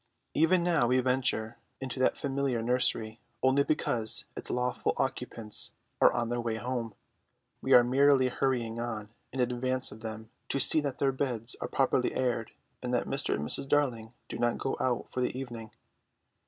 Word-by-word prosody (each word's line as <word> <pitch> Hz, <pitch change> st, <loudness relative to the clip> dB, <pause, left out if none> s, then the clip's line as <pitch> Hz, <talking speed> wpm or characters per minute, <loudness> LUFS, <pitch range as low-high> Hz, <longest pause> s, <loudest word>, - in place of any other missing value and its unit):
Even 170 Hz, +3 st, +3 dB
now 165 Hz, -8 st, +2 dB
we 130 Hz, +1 st, +3 dB
venture 125 Hz, -3 st, 0 dB, 0.2 s
into 130 Hz, -1 st, -5 dB
that 130 Hz, -, +2 dB
familiar 135 Hz, -4 st, -1 dB
nursery 115 Hz, -2 st, +1 dB, 0.2 s
only 130 Hz, +2 st, +4 dB
because 115 Hz, -7 st, 0 dB
its -, -, -7 dB
lawful 125 Hz, 0 st, -1 dB
occupants 110 Hz, -2 st, -2 dB, 0.3 s
are -, -, +7 dB
on 120 Hz, -1 st, -2 dB
their 120 Hz, 0 st, -1 dB
way 115 Hz, -1 st, -2 dB
home; 120 Hz, -1 st, -4 dB, 0.7 s
we -, -, +2 dB
are 120 Hz, -, +8 dB
merely 135 Hz, +1 st, +4 dB
hurrying 120 Hz, -3 st, -1 dB
on 110 Hz, -3 st, -4 dB, 0.2 s
in 130 Hz, -, -6 dB
advance 125 Hz, +1 st, +1 dB
of 105 Hz, -, -11 dB
them 110 Hz, 0 st, -7 dB, 0.2 s
to 140 Hz, -, 0 dB
see 155 Hz, -, +8 dB
that 140 Hz, -3 st, -3 dB
their 135 Hz, -1 st, +2 dB
beds 125 Hz, -3 st, -1 dB
are -, -, -2 dB
properly -, -, +1 dB
aired 120 Hz, -3 st, -1 dB, 0.3 s
and -, -, -4 dB
that -, -, 0 dB
Mr. -, -, 0 dB
and 75 Hz, +1 st, -4 dB
Mrs. 135 Hz, -, +1 dB
Darling 120 Hz, -7 st, +1 dB, 0.2 s
do -, -, -6 dB
not 120 Hz, 0 st, +1 dB
go 135 Hz, -, -2 dB
out 125 Hz, -2 st, -1 dB
for 130 Hz, -, -2 dB
the 125 Hz, -, -1 dB
evening. 120 Hz, -4 st, -7 dB
125 Hz, 175 wpm, -29 LUFS, 115-135 Hz, 0.7 s, are